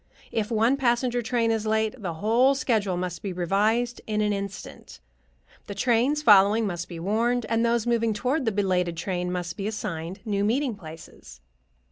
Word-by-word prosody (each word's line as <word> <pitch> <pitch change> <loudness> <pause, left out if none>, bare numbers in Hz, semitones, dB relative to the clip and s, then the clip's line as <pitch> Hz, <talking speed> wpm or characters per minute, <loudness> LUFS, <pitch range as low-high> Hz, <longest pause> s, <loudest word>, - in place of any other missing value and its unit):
If 215 -2 -1
one 230 +4 +2
passenger 245 -1 +1
train 230 0 0
is 220 -1 -1
late, 220 0 +1
the 175 -4 -4
whole 235 +9 +3
schedule 215 -8 0
must 180 -1 -4
be 200 - -4
revised 210 +7 0
in 215 -1 -1
an 210 -1 +1
instant; 200 -1 -7 0.7
the 200 - -6
trains 250 +7 +1
following 210 0 +6
must 175 -3 -4
be 170 -2 -7
warned, 230 +6 0
and 230 0 +1
those 235 -1 +1
moving 230 -1 +1
toward 255 +7 -1
the 225 - +1
belated 180 -4 0
train 180 +1 -2
must 175 -1 -4
be 200 0 -3
assigned 185 -4 -5
new 200 -2 0
meeting 250 +4 +1
places. 160 - -12
215 Hz, 170 wpm, -25 LUFS, 185-235 Hz, 0.7 s, following